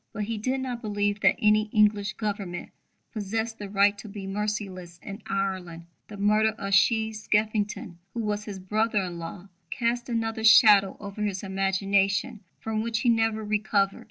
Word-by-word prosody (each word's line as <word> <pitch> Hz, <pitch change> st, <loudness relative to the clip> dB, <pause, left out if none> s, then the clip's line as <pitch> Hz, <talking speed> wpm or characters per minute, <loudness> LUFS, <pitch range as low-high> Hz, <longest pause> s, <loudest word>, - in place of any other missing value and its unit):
But 210 Hz, -, -3 dB
he 220 Hz, +1 st, -3 dB
did 260 Hz, +4 st, -1 dB
not 250 Hz, -2 st, -4 dB
believe 205 Hz, -1 st, -1 dB
that 195 Hz, 0 st, +4 dB
any 215 Hz, 0 st, +3 dB
English 210 Hz, -1 st, +2 dB
Government 200 Hz, -5 st, -4 dB, 0.4 s
possessed 225 Hz, +1 st, -3 dB
the 205 Hz, -1 st, -6 dB
right 200 Hz, +1 st, +3 dB
to 215 Hz, -, -9 dB
be 200 Hz, -1 st, -7 dB
merciless 195 Hz, -4 st, -4 dB
in 200 Hz, +2 st, -8 dB
Ireland. 185 Hz, -4 st, -3 dB, 0.2 s
The 210 Hz, -, -10 dB
murder 215 Hz, +2 st, +3 dB
of 195 Hz, -2 st, -4 dB
Sheehy 220 Hz, +2 st, +3 dB
Skeffington, 210 Hz, -4 st, -1 dB, 0.2 s
who 235 Hz, -, -1 dB
was 210 Hz, -1 st, -2 dB
his 205 Hz, -3 st, -6 dB
brother 210 Hz, +2 st, 0 dB
in 175 Hz, -2 st, -6 dB
law, 175 Hz, +3 st, -8 dB, 0.2 s
cast 240 Hz, +3 st, -1 dB
another 225 Hz, -1 st, -2 dB
shadow 210 Hz, -3 st, +7 dB
over 200 Hz, 0 st, -7 dB
his 200 Hz, -2 st, -2 dB
imagination 195 Hz, +3 st, 0 dB, 0.2 s
from 220 Hz, -1 st, -2 dB
which 230 Hz, 0 st, -2 dB
he 245 Hz, -, +2 dB
never 225 Hz, -1 st, +1 dB
recovered. 210 Hz, -2 st, 0 dB
210 Hz, 165 wpm, -26 LUFS, 195-220 Hz, 0.4 s, shadow